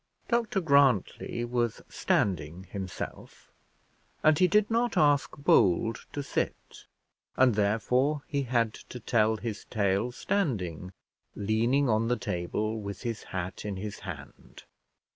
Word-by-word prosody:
Dr 230 Hz, -5 st, +1 dB
Grantly 140 Hz, -, +2 dB
was 120 Hz, -1 st, -1 dB
standing 85 Hz, -2 st, -1 dB
himself, 95 Hz, -1 st, -7 dB, 0.7 s
and 155 Hz, -1 st, +5 dB
he 185 Hz, -, +6 dB
did 210 Hz, +4 st, +3 dB
not 235 Hz, +1 st, +1 dB
ask 145 Hz, -1 st, +3 dB
Bold 110 Hz, -, +2 dB
to 145 Hz, -, -4 dB
sit, -, -, -4 dB, 0.5 s
and 130 Hz, -2 st, +5 dB
therefore 125 Hz, +8 st, +1 dB
he 140 Hz, -1 st, -1 dB
had 120 Hz, -4 st, +1 dB
to 125 Hz, -, -10 dB
tell 110 Hz, -1 st, +2 dB
his 110 Hz, -2 st, -5 dB
tale 100 Hz, +2 st, 0 dB
standing, 100 Hz, -, -2 dB, 0.4 s
leaning 115 Hz, +7 st, +1 dB
on 110 Hz, 0 st, +2 dB
the 125 Hz, +1 st, +1 dB
table, 105 Hz, +3 st, -2 dB
with 100 Hz, -2 st, -7 dB
his 115 Hz, -2 st, -3 dB
hat 95 Hz, 0 st, -5 dB
in 105 Hz, -2 st, -3 dB
his 100 Hz, +2 st, -6 dB
hand. 75 Hz, -7 st, -10 dB
115 Hz, 125 wpm, -29 LUFS, 100-140 Hz, 0.7 s, he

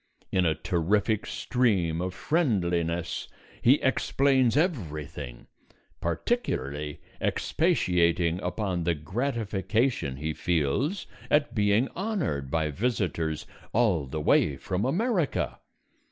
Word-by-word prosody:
In 90 Hz, -2 st, +3 dB
a 80 Hz, -, +2 dB
terrific 95 Hz, +7 st, 0 dB
stream 95 Hz, -10 st, +1 dB
of 90 Hz, 0 st, -3 dB
friendliness 85 Hz, -, 0 dB, 0.3 s
he 125 Hz, +4 st, +6 dB
explains 130 Hz, -1 st, +3 dB
everything, 75 Hz, -, -2 dB, 0.5 s
particularly 75 Hz, -, -2 dB, 0.2 s
expatiating 85 Hz, 0 st, +2 dB
upon 90 Hz, -1 st, -2 dB
the 85 Hz, 0 st, +1 dB
gratification 105 Hz, -, -1 dB
he 80 Hz, +3 st, -3 dB
feels 90 Hz, -, 0 dB, 0.2 s
at 145 Hz, -4 st, +2 dB
being 105 Hz, +3 st, +3 dB
honoured 170 Hz, -, -2 dB
by 80 Hz, 0 st, 0 dB
visitors 85 Hz, -, -1 dB, 0.3 s
all 100 Hz, -, +2 dB
the 75 Hz, +4 st, -4 dB
way 75 Hz, -1 st, +3 dB
from 95 Hz, -, -2 dB
America. 180 Hz, -, 0 dB
90 Hz, 95 wpm, -27 LUFS, 80-125 Hz, 0.5 s, he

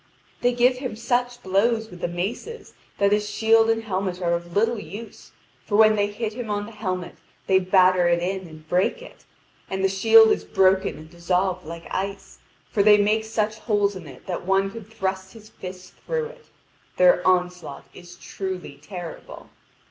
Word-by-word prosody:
They 245 Hz, -, +3 dB
give 250 Hz, +1 st, +3 dB
him 255 Hz, -4 st, -5 dB
such 245 Hz, +1 st, -1 dB
blows 220 Hz, +4 st, +1 dB
with 175 Hz, -1 st, -12 dB
the -, -, 0 dB
maces 205 Hz, -, -5 dB, 0.2 s
that 200 Hz, 0 st, +2 dB
his 210 Hz, 0 st, +1 dB
shield 225 Hz, +2 st, +3 dB
and 225 Hz, 0 st, +1 dB
helmet 185 Hz, -3 st, -3 dB
are 170 Hz, -2 st, 0 dB
of 170 Hz, 0 st, -4 dB
little 225 Hz, +2 st, +2 dB
use, 220 Hz, +2 st, -10 dB, 0.3 s
for 205 Hz, -, -2 dB
when 215 Hz, 0 st, +6 dB
they 205 Hz, -1 st, +1 dB
hit 210 Hz, +1 st, -4 dB
him 235 Hz, -1 st, -6 dB
on 205 Hz, 0 st, -2 dB
the 230 Hz, -, -10 dB
helmet 185 Hz, -5 st, -4 dB, 0.3 s
they 190 Hz, 0 st, +4 dB
batter 185 Hz, -1 st, +4 dB
it 170 Hz, 0 st, +3 dB
in 185 Hz, +1 st, -3 dB
and 155 Hz, -1 st, -14 dB
break 185 Hz, -, 0 dB
it; -, -, -15 dB, 0.4 s
and 190 Hz, 0 st, -2 dB
the -, -, +5 dB
shield 220 Hz, +3 st, +6 dB
is -, -, 0 dB
broken 190 Hz, -1 st, +2 dB
and 155 Hz, +1 st, -12 dB
dissolved 180 Hz, 0 st, -1 dB
like 165 Hz, 0 st, -8 dB
ice, 195 Hz, +1 st, -5 dB, 0.3 s
for 210 Hz, -, +2 dB
they 210 Hz, +1 st, +7 dB
make 210 Hz, +2 st, +2 dB
such 215 Hz, -1 st, -2 dB
holes 205 Hz, -2 st, +1 dB
in 175 Hz, -4 st, -9 dB
it 130 Hz, -3 st, -13 dB
that 180 Hz, -2 st, -4 dB
one 195 Hz, 0 st, +2 dB
could 225 Hz, -1 st, -11 dB
thrust 190 Hz, -3 st, -3 dB
his 215 Hz, -2 st, -14 dB
fists 185 Hz, 0 st, -10 dB, 0.2 s
through 480 Hz, -1 st, -1 dB
it: -, -, -16 dB, 0.5 s
their 180 Hz, 0 st, +5 dB
onslaught 180 Hz, -1 st, 0 dB
is 175 Hz, 0 st, -13 dB
truly 185 Hz, -6 st, -6 dB
terrible. 175 Hz, 0 st, -9 dB
195 Hz, 185 wpm, -24 LUFS, 180-220 Hz, 0.5 s, they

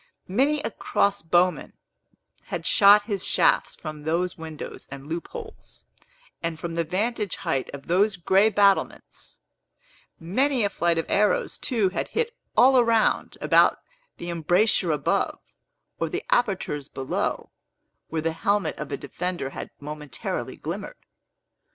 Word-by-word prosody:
Many 275 Hz, +10 st, +2 dB
a 225 Hz, -, -2 dB
crossbowman 180 Hz, -4 st, +1 dB, 0.7 s
had -, -, -5 dB
shot 205 Hz, -1 st, +7 dB
his 200 Hz, -4 st, -2 dB
shafts -, -, +2 dB
from 155 Hz, -2 st, -8 dB
those 170 Hz, +4 st, -1 dB
windows 160 Hz, -2 st, -8 dB
and 140 Hz, 0 st, -9 dB
loop 165 Hz, +3 st, -4 dB
holes, 460 Hz, -2 st, -11 dB, 0.6 s
and 165 Hz, -1 st, -3 dB
from 170 Hz, 0 st, -5 dB
the 170 Hz, 0 st, 0 dB
vantage 210 Hz, +5 st, -1 dB
height 130 Hz, -, -2 dB
of 140 Hz, -1 st, -9 dB
those 200 Hz, +3 st, +2 dB
gray 190 Hz, +4 st, +4 dB
battlements; 200 Hz, -2 st, 0 dB, 0.8 s
many 250 Hz, -, +1 dB
a 200 Hz, -, 0 dB
flight 170 Hz, -3 st, +1 dB
of 165 Hz, -, 0 dB
arrows, 210 Hz, +1 st, +1 dB
too, 220 Hz, -7 st, +1 dB
had 185 Hz, -, -3 dB
hit 470 Hz, +1 st, -2 dB, 0.2 s
all 255 Hz, 0 st, +6 dB
round 230 Hz, -1 st, +1 dB
about -, -, +4 dB, 0.4 s
the 175 Hz, 0 st, -5 dB
embrasures 175 Hz, +3 st, +2 dB
above, 145 Hz, -, 0 dB, 0.6 s
or -, -, -1 dB
the -, -, -4 dB
apertures 190 Hz, -, 0 dB
below, 135 Hz, -1 st, -3 dB, 0.6 s
where 160 Hz, -1 st, -3 dB
the 165 Hz, 0 st, 0 dB
helmet 200 Hz, +5 st, 0 dB
of 150 Hz, -1 st, -6 dB
a 140 Hz, -, -2 dB
defender 180 Hz, -5 st, -4 dB
had -, -, -7 dB
momentarily 150 Hz, -3 st, -5 dB
glimmered. -, -, -6 dB
180 Hz, 135 wpm, -25 LUFS, 160-210 Hz, 0.8 s, shot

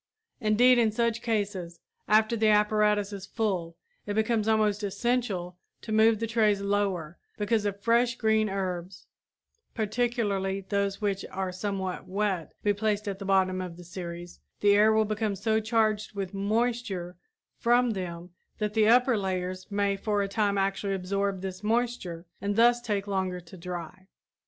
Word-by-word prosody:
Indeed 240 Hz, +4 st, +5 dB
in 225 Hz, -2 st, +3 dB
such 235 Hz, +1 st, 0 dB
cases, 200 Hz, -7 st, -2 dB, 0.3 s
after 220 Hz, +2 st, +4 dB
the 220 Hz, -1 st, +2 dB
apparatus 210 Hz, -1 st, +3 dB
is 195 Hz, -1 st, -7 dB
full, 185 Hz, -8 st, -2 dB, 0.3 s
it 205 Hz, -, -2 dB
becomes 220 Hz, 0 st, +1 dB
almost 215 Hz, -2 st, +2 dB
essential 200 Hz, -4 st, -1 dB, 0.2 s
to 220 Hz, -, -7 dB
move 220 Hz, +1 st, +5 dB
the 230 Hz, -, -1 dB
trays 215 Hz, -3 st, +2 dB
lower, 200 Hz, -5 st, -1 dB, 0.2 s
because 210 Hz, 0 st, 0 dB
if 200 Hz, 0 st, -3 dB
fresh 235 Hz, +1 st, +3 dB
green 220 Hz, -1 st, +2 dB
herbs, 185 Hz, -1 st, -4 dB, 0.7 s
particularly 210 Hz, -4 st, -1 dB
those 200 Hz, 0 st, -1 dB
which 200 Hz, -2 st, -1 dB
are 190 Hz, -1 st, -3 dB
somewhat 190 Hz, 0 st, -4 dB
wet, 190 Hz, -3 st, -2 dB
be 205 Hz, -, +3 dB
placed 210 Hz, 0 st, -1 dB
at 195 Hz, -1 st, -3 dB
the 195 Hz, -, -6 dB
bottom 190 Hz, -1 st, +2 dB
of 175 Hz, -2 st, -7 dB
the 180 Hz, -, -11 dB
series, 175 Hz, 0 st, -8 dB, 0.2 s
the 205 Hz, 0 st, +5 dB
air 210 Hz, +2 st, +5 dB
will 220 Hz, 0 st, +3 dB
become 215 Hz, -1 st, -1 dB
so 220 Hz, +3 st, +1 dB
charged 215 Hz, -1 st, 0 dB
with 195 Hz, -2 st, -4 dB
moisture 205 Hz, -3 st, -1 dB, 0.4 s
from 240 Hz, +1 st, +3 dB
them 175 Hz, -3 st, -5 dB, 0.3 s
that 210 Hz, -1 st, -2 dB
the 215 Hz, -1 st, +3 dB
upper 250 Hz, +2 st, +5 dB
layers 185 Hz, -2 st, -3 dB
may 200 Hz, -1 st, +1 dB
for 205 Hz, 0 st, 0 dB
a -, -, -2 dB
time 200 Hz, 0 st, 0 dB
actually 195 Hz, 0 st, 0 dB
absorb 195 Hz, +1 st, -2 dB
this 190 Hz, 0 st, -5 dB
moisture 220 Hz, -6 st, -1 dB, 0.2 s
and 200 Hz, +1 st, -1 dB
thus 240 Hz, +2 st, +5 dB
take 205 Hz, -4 st, -2 dB
longer 190 Hz, -2 st, -2 dB
to 175 Hz, +1 st, -14 dB
dry. 180 Hz, +1 st, -7 dB
205 Hz, 160 wpm, -28 LUFS, 190-220 Hz, 0.7 s, Indeed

